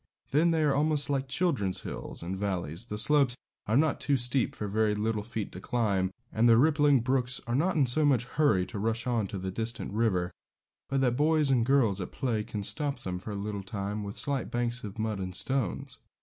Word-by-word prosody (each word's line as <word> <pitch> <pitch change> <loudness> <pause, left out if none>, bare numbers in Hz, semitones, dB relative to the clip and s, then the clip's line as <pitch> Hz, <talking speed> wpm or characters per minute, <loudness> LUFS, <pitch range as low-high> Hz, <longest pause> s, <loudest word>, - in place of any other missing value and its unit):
Then 155 +5 +4
they 160 -2 +2
are 145 -2 +3
almost 145 0 +1
like 135 -1 -1
children's 135 - 0
hills - - -7
and 90 +3 -3
valleys; 95 -2 -3
the 105 -3 -5
slopes 130 +1 +4 0.3
are 110 +4 +2
not 155 0 +2
too 140 -1 +2
steep 125 +1 +1
for 105 - -4
very 105 +1 +1
little 110 0 -1
feet 110 -1 -5
to 95 - -9
climb, 100 -6 0 0.2
and 115 +2 +4
the 115 - +7
rippling 145 -1 +4
brooks 130 0 0
are 120 - -3
not 170 +9 +1
in 145 -4 +4
so 130 +5 +3
much 130 -5 +3
hurry 125 -9 +2
to 100 - -6
rush 115 +2 -1
on 115 -5 0
to 100 - -5
the 95 0 -4
distant 110 0 -3
river, 95 -5 +1 0.6
but 135 -1 +1
that 125 -2 +2
boys 150 -1 +3
and 120 -3 +2
girls 115 -8 +3
at 90 - -6
play 115 -5 -1
can 105 -1 -5
stop 145 +5 -1
them 95 -6 -4
for 100 - -9
a 105 - -4
little 100 0 -4
time 100 +2 -4
with 100 0 -7
slight 140 -2 -1
banks 120 +1 -1
of 105 0 -7
mud 110 -2 -2
and 90 -1 -5
stones. 130 -5 -2
115 Hz, 220 wpm, -29 LUFS, 105-140 Hz, 0.6 s, the